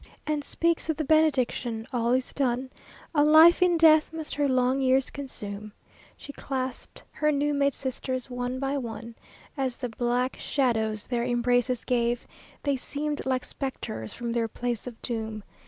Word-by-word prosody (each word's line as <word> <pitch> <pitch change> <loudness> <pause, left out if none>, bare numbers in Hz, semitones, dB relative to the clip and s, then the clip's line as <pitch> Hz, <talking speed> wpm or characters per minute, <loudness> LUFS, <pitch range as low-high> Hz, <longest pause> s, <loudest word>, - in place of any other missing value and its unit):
And 300 -1 -1
speaks 335 +3 0
the 320 -1 -1
benediction; 260 -7 +2
all 235 -1 +1
is 255 0 0
done. 260 -1 -1 0.4
A 290 -2 +4
life 315 +4 +7
in 355 -1 +4
death 315 -1 +6
must 320 -1 -5
her 285 -1 +1
long 255 +1 +2
years 265 0 +3
consume 215 -7 -6 0.5
She 285 - -10
clasped 260 -2 -5
her 300 0 +1
new 290 0 +1
made 280 -1 +2
sisters 260 -1 -3
one 245 0 -3
by 275 +1 -1
one. 230 -1 -6 0.4
As 265 -4 -2
the 250 - -4
black 245 +2 -1
shadows 220 -6 0
their 240 -2 -1
embraces 245 0 +1
gave 240 -1 0 0.4
They 280 -2 +1
seemed 295 +2 -3
like 255 -1 0
spectres 110 - -5
from 235 -1 -4
their 230 -1 0
place 240 +1 -3
of 235 -2 -8
doom. 220 -3 -4
255 Hz, 155 wpm, -27 LUFS, 240-285 Hz, 0.5 s, life